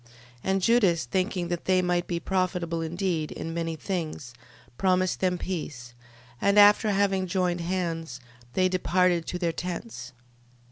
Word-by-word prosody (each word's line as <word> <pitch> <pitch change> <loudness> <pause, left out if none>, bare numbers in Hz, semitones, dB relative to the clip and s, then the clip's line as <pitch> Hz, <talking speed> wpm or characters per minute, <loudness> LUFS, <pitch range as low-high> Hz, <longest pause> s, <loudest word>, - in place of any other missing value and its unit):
12:12. - - -24 0.4
And 190 0 +1
Judas 200 -8 +3
thinking 185 -2 -1
that 175 -1 -3
they 185 -1 +3
might 180 -1 0
be 170 -1 -2
profitable 180 -2 -1
indeed 165 -1 -2
in 165 - -5
many 165 -1 -2
things, 155 -7 -4 0.4
promised 185 +2 +1
them 180 -1 +1
peace, 145 -10 -5 0.5
and 200 +1 +3
after 205 +1 +7
having 195 -2 +1
joined 180 -1 0
hands, 165 -6 -3 0.3
they 185 0 +3
departed 180 -2 +1
to 180 - -3
their 170 -2 0
tents. 170 - -6
180 Hz, 145 wpm, -27 LUFS, 165-190 Hz, 0.5 s, after